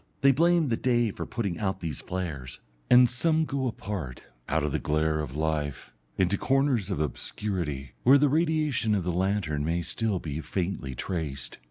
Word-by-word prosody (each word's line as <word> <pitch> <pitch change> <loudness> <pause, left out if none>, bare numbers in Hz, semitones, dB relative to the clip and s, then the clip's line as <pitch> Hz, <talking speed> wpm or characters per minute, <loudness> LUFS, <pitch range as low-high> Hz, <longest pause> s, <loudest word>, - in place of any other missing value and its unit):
They 140 - +7
blame 165 +1 +3
the 115 - +1
day 120 -3 +2
for - - -6
putting 100 -8 -3
out 95 -2 -1
these 80 -5 -4
flares. 75 -9 -5 0.3
And 125 0 +8
some 160 +6 +1
go 135 -2 -1
apart, 95 - -5 0.2
out 80 0 +1
of 75 - 0
the - - 0
glare 75 +1 +1
of 70 -3 -4
life, 75 -2 -2 0.2
into 95 +1 +2
corners 135 -7 +2
of 95 - -2
obscurity, 75 - -3
where 135 +3 +7
the 145 +1 +4
radiation 150 -7 +2
of 95 - 0
the 90 - -1
lantern 90 -5 0
may 85 +2 0
still 105 +3 -1
be 80 -2 -4
faintly 85 -8 -3
traced. 70 -6 -4
95 Hz, 175 wpm, -27 LUFS, 75-125 Hz, 0.3 s, And